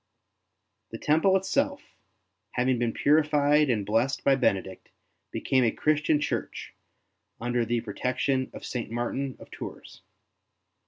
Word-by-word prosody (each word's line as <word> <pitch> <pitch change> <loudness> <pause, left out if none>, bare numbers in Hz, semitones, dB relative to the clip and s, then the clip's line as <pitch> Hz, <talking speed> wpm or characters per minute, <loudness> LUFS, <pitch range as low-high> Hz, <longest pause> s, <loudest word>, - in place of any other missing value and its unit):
The 115 - -7
temple 160 - +3
itself, 280 +9 0 0.7
having 125 0 +1
been 120 -1 +1
purified 150 +1 +3
and 105 -5 0
blessed 115 +6 0
by 140 - +4
Benedict, 95 -7 -1 0.4
became 130 -1 +1
a 115 - +4
Christian 150 +3 +1
church - - -4 0.7
under 120 0 0
the 120 +1 0
pro 110 -3 -7
tection 130 +3 -1
of - - -9
St. 120 -4 -4
Martin 120 +3 -3
of - - -14
Tours. - - -9
130 Hz, 125 wpm, -27 LUFS, 120-150 Hz, 0.7 s, by